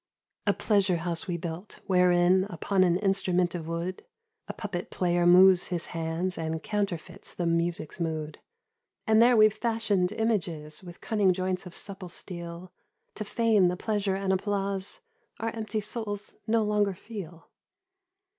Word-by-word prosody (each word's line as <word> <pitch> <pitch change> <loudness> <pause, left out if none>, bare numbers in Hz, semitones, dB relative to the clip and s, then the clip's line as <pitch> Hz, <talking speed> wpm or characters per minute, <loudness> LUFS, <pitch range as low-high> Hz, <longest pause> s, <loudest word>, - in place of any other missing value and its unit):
A - - +5
pleasure 200 -4 +2
house 170 +4 -2
we 175 -2 -1
built, 170 +4 -7
wherein 180 0 +4
Upon 190 +1 +1
an 175 -2 +3
instrument 185 -3 +1
of 165 -3 -5
wood 170 +3 -4 0.4
A - - -3
puppet 200 -5 -5
player 175 -1 +1
moves 185 0 +7
his 175 -2 -2
hands 165 +2 -2
And 160 0 -3
counterfeits 200 -6 -3
the 175 - -2
music 170 -2 0
's - - -14
mood; 155 -2 -3 0.7
And 220 -1 +5
there 240 0 +6
we 215 0 +8
fashioned 220 -5 0
images 170 -9 -2
With 175 -2 -12
cunning 205 -4 +2
joints 185 0 -2
of 175 - -9
supple 190 -3 -5
steel 170 0 -7 0.4
To 215 - -5
feign 215 -3 +3
the 180 +1 -1
pleasure 205 -2 -1
and 195 0 0
applause 195 - -2 0.4
Our 225 - -1
empty 220 -1 -3
souls 210 -1 -4
no 225 0 +3
longer 210 -2 +1
feel. 180 -5 -9
185 Hz, 150 wpm, -28 LUFS, 175-205 Hz, 0.7 s, we